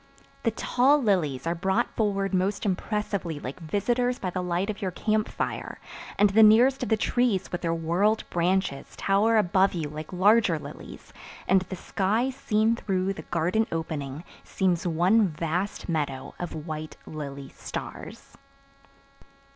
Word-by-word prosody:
The 230 - +2
tall 255 +5 +3
lilies 165 - 0
are 165 - +1
brought 190 +7 0
forward 200 -3 0
most 195 +3 0
impressively 195 -4 -2
like 135 +3 -7
visitors 240 +9 0
by 185 - -3
the 185 - -2
light 180 +3 -1
of 210 - -10
your 190 - -1
camp 215 +4 0
fire - - -4 0.4
and 205 -1 +4
the 220 +3 +5
nearest 240 +6 +6
of 250 - -2
the 220 - +3
trees 220 -4 0
with 175 - -3
their 165 -1 0
whorled 175 +7 +1
branches 175 -5 0
tower 210 +3 +2
above 190 -1 +3
you 160 -3 -2
like 155 +1 -7
larger 195 -1 +4
lilies - - -11 0.3
and 190 0 +4
the 185 0 -6
sky 215 +8 0
seen 225 -3 +1
through 195 -3 -1
the 160 - -8
garden 180 +7 +1
opening 155 -3 -4 0.2
seems 180 -2 0
one 185 +6 +3
vast 170 +4 -3
meadow 145 -5 -2
of 160 -3 -5
white 155 -1 -6
lily 140 -3 -7
stars. - - -8
190 Hz, 150 wpm, -26 LUFS, 165-215 Hz, 0.4 s, nearest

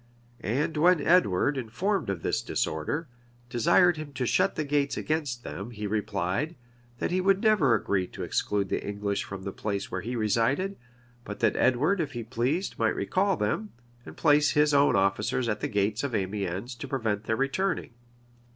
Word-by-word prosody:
And 150 +9 -1
when 175 +2 +5
Edward, 145 - +3
informed 155 - -1
of 95 -4 -3
this - - 0
disorder, 115 - -2 0.4
desired 160 +8 +4
him 155 -2 -7
to 130 - -2
shut 185 +10 +2
the 155 - -1
gates 145 -1 0
against 145 -6 -2
them, 100 +4 -6
he 105 -3 -6
replied, 105 - -1 0.4
that - - -2
he 185 +1 +1
would 195 +2 +2
never 185 - +4
agree 95 -3 0
to - - -7
exclude 100 -2 -1
the - - -1
English 100 0 -2
from 95 -1 -8
the 100 - -4
place 100 0 -4
where 95 - -2
he 120 +6 -4
resided; 120 - +1 0.5
but 105 - -7
that 115 -2 +3
Edward, 150 +10 +2
if 145 -3 -4
he 120 -2 -4
pleased, 130 - -2
might - - +2
recall 195 -1 +1
them, 155 - -2 0.3
and - - -11
place 150 -1 +4
his 150 0 +3
own 140 0 +4
officers 100 +5 +1
at 105 -1 -1
the - - -2
gates 105 +4 0
of 135 -5 -2
Amiens 100 +3 -2
to 120 +3 -7
prevent 110 -6 -2
their 110 - 0
returning. 150 +2 -1
125 Hz, 180 wpm, -27 LUFS, 105-155 Hz, 0.5 s, when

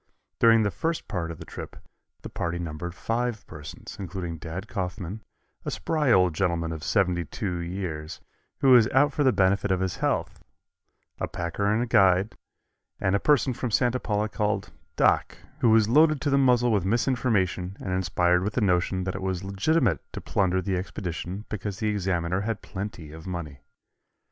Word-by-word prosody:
During 115 -1 +6
the 100 - +1
first 165 - -2
part 90 -6 -3
of 85 - -6
the - - -10
trip - - -8 0.5
the - - -6
party 85 +1 -3
numbered 85 +1 -5
five 115 +3 -2
persons, 75 -2 -10
including 90 -4 -5
Dad 90 +5 -6
Coffman, 95 0 -4 0.4
a - - -3
spry 150 -5 0
old 90 -5 +4
gentleman 85 -2 0
of 80 -1 -6
seventy 90 -4 +1
two 90 +2 -4
years, 85 -3 -5 0.4
who 135 - +5
was 120 -4 +7
out 145 +2 +3
for 145 - +1
the 130 - +5
benefit 100 0 +2
of 95 -1 +2
his 95 -2 -2
health, - - -1 0.8
a - - -1
packer 85 +4 -3
and 110 +4 +1
guide, 95 -1 +4 0.6
and 95 - +1
a - - +2
person 140 -1 +3
from 125 +1 -3
Santa 125 +3 +2
Paula 105 -2 -1
called 105 -1 -2 0.2
"Doc," - - +2 0.2
who 120 - +4
was 110 -1 +5
loaded 155 +4 +5
to 145 - 0
the - - +4
muzzle 125 -2 +4
with 100 -5 +2
misinformation 100 - 0
and 95 - -3
inspired 90 -1 +2
with 105 +1 -2
the 125 - 0
notion 95 -1 +1
that 95 0 -2
it 95 - -5
was 95 -1 -2
legitimate 100 - +1
to - - -4
plunder 95 -1 0
the 95 0 -1
expedition 90 +1 -5
because 105 -1 -4
the 110 +1 0
Examiner 90 -3 0
had 110 0 -3
plenty 95 -6 -6
of 80 +3 -10
money. 80 -6 -5
95 Hz, 180 wpm, -26 LUFS, 90-115 Hz, 0.8 s, was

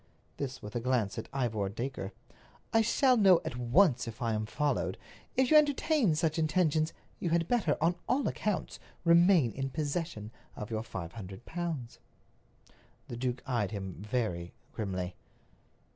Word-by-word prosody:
This 135 -2 -5
with 105 0 -8
a - - +1
glance 120 -4 0
at - - -8
Ivor 115 -7 -1
Dacre. 115 -1 -4 0.6
"I 225 - +6
shall 250 +3 +4
know 190 -5 +6
at - - -3
once 125 +2 +3
if 115 +2 -7
I 115 -3 0
am 110 0 -2
followed. 145 +6 -1 0.4
If 260 +1 +3
you 310 - +9
entertain 290 - +3
such 160 0 0
intentions, 155 -1 +2 0.3
you 175 - -1
had 165 0 +2
better, 215 -12 +2
on 165 +3 +3 0.2
all 270 +2 +2
accounts, 210 -3 -2 0.3
remain 170 - +6
in 135 +2 -3
possession 145 -7 -3 0.2
of 105 +1 -6
your 110 -1 -1
five 95 -7 -6
hundred 100 +1 -9
pounds." 160 -8 -4 1.1
The - - -4
duke 125 0 -2
eyed 120 -7 0
him 95 -3 -5
very 105 -6 -2 0.2
grimly. 95 -4 -3
130 Hz, 155 wpm, -31 LUFS, 110-170 Hz, 1.1 s, you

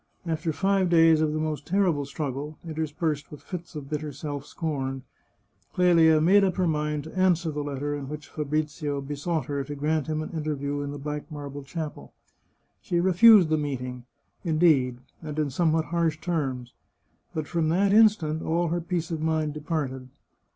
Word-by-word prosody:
After 160 0 -1
five 195 +2 +1
days 165 -2 +5
of 155 -1 +2
the 155 - -2
most 155 -2 -3
terrible 175 -7 +2
struggle, 145 +1 -4
interspersed 155 -1 -2
with 150 - -11
fits 175 -2 -7
of 145 -2 -6
bitter 150 0 -3
self 145 0 -6
scorn, 135 -5 -3 0.7
Clelia 165 -3 +5
made 190 +6 +5
up 190 -2 +1
her 185 - +1
mind 150 -2 -1
to 160 - -11
answer 180 -3 +2
the 150 0 -3
letter 145 0 -3
in 140 -2 -5
which 150 0 -7
Fabrizio 150 -1 -2
besought 145 +4 -2
her 140 -1 -2
to 145 +2 -6
grant 150 0 0
him 155 0 -1
an - - -7
interview 145 -3 -2
in 145 - -4
the 145 - -5
black 150 +2 -5
marble 145 -1 -6
chapel. 155 +2 -7 0.7
She 175 - 0
refused 190 +1 +7
the 155 - +2
meeting, 125 -4 -4 0.4
indeed, 155 -7 +3 0.2
and 155 -2 -6
in 150 -3 0
somewhat 160 +2 +2
harsh 165 -2 0
terms; 135 -8 -2 0.6
but 155 -1 -2
from 165 -1 0
that 195 +4 +3
instant 205 -8 +4
all 170 +1 0
her 175 +1 -1
peace 170 -1 -3
of 160 -2 -2
mind 155 -1 0
departed. 145 -4 -3
155 Hz, 170 wpm, -26 LUFS, 145-170 Hz, 0.7 s, refused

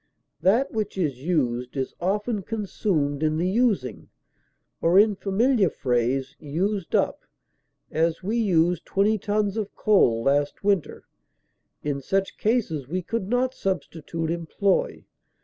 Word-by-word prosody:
That 225 +9 +3
which 215 -3 -3
is 145 -8 -1
used 125 -6 -1
is 130 - -2
often 205 +4 0
consumed 185 -9 -1
in 155 0 +1
the 175 +3 0
using, 190 - 0 0.7
or 170 +3 +4
in 210 0 +5
familiar 205 +1 +2
phrase 130 +1 -1
used 185 +6 -2
up; - - +1 0.7
as, 165 +2 0
we 210 +5 -1
used 175 -6 +2
twenty 205 +2 +1
tons 205 +1 0
of 210 -2 -4
coal 120 - +3
last 145 +4 +1
winter; 200 -5 0 0.8
in 145 -2 -2
such 195 +7 -1
cases 205 - 0
we 180 +5 -3
could 200 +1 -3
not 250 +2 +1
substitute 165 - -3
employ. 170 +3 -1
185 Hz, 130 wpm, -25 LUFS, 150-210 Hz, 0.8 s, in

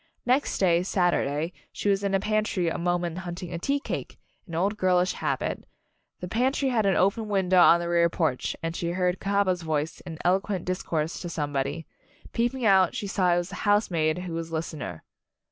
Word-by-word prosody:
Next 260 +3 +1
day, 175 -3 +3
Saturday, 175 -4 0 0.2
she - - -4
was 200 0 +2
in 200 - 0
the 195 - +3
pantry 215 -4 0
a - - -3
moment 175 0 -1
hunting 175 -1 -6
a 170 - -3
tea 280 +10 0
cake - - -5 0.3
an 165 - -6
old 195 +5 +1
girlish 185 -2 +2
habit - - -2 0.6
the 180 - -4
pantry 260 +7 +1
had 220 -5 +2
an 195 - +3
open 200 +4 +2
window 190 -2 +3
on 170 - +7
the 170 - -3
rear 170 0 +3
porch, 160 -7 -1
and 165 0 -2
she 170 0 -2
heard 180 0 0
Cahaba's 195 -2 +1
voice 155 -1 -2
in 165 -3 -8
eloquent 190 +1 +1
discourse 165 -3 -2
to 175 - -5
somebody. 145 0 -2 0.5
Peeping 240 +1 0
out 190 -3 +4
she - - -3
saw 185 -3 +2
it - - +1
was 175 0 -2
the - - -7
housemaid 175 -7 +2
who 180 -2 -5
was 165 0 -4
listener. 155 - -5
180 Hz, 190 wpm, -26 LUFS, 165-200 Hz, 0.6 s, on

